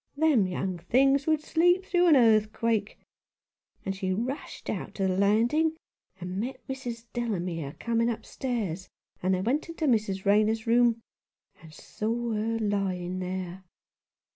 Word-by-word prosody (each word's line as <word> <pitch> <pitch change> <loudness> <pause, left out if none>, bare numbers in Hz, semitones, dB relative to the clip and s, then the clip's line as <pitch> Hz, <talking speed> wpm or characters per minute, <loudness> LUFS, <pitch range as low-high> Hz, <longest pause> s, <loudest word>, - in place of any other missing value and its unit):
Them 290 -11 +3
young 185 0 -3
things 270 - +3
would 310 -1 +2
sleep 350 +4 +2
through 355 -2 +3
an 320 - +7
earthquake. 220 -2 +2 0.9
And 195 - -2
she 190 -1 -2
rushed 240 +9 -4
out - - -4
to 195 - 0
the 185 - 0
landing, 235 +12 +2 0.4
and 180 +1 -4
met 250 +5 -5
Mrs. 245 -3 -5
Delamere 175 - -3
coming 230 0 +1
upstairs; 220 -6 -4 0.3
and 185 +1 +2
they 185 - -2
went 270 - -1
into 330 -1 -3
Mrs. 210 -7 +1
Rayner's 215 +2 +3
room, 235 0 +3 0.6
and 160 - -13
saw 230 +8 -3
her 225 +1 -1
lying 190 -4 -1
there. 185 0 -5
220 Hz, 140 wpm, -28 LUFS, 190-250 Hz, 0.9 s, an